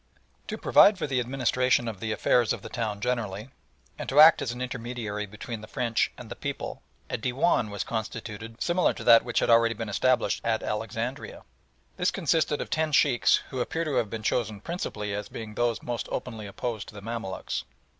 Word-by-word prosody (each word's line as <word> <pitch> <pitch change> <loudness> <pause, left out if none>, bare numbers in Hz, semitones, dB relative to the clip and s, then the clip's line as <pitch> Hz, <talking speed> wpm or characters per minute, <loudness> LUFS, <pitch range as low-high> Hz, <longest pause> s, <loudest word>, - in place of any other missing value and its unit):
To - - -4
provide 205 -1 +6
for 175 - -2
the 135 -3 0
administration 125 -1 +1
of 110 -4 -5
the 110 +1 -3
affairs 120 +2 +2
of - - -7
the 115 - -7
town 110 -4 -3
generally, 115 -2 -2 0.5
and - - -4
to 140 - +3
act 155 +1 +9
as 120 - -2
an 120 - -7
intermediary 120 -4 -4
between 110 +2 -7
the 110 - -10
French 115 0 0
and - - -9
the - - -7
people, - - -5 0.3
a - - -3
Dewan 125 -1 +1
was 100 -1 -3
constituted 115 0 -5
similar 175 +1 +2
to - - -7
that 115 -1 +7
which 120 - 0
had - - +2
already 115 0 +5
been 110 0 -5
established 130 +5 +1
at 110 -1 0
Alexandria. 115 +4 -4 0.5
This 180 - +2
consisted 160 -4 +1
of - - -6
ten 155 0 +1
Sheikhs, 140 -4 +4
who 130 - -3
appear 165 +6 -1
to 150 - -1
have 110 - +1
been 110 0 -5
chosen 110 -3 0
principally 105 - -4
as 105 0 -4
being 110 -2 -7
those 120 +1 0
most 120 -1 -4
openly 110 -5 -4
opposed 110 +1 -4
to - - -12
the 100 - -8
Mamaluks. 115 -4 -4
115 Hz, 195 wpm, -27 LUFS, 110-125 Hz, 0.5 s, act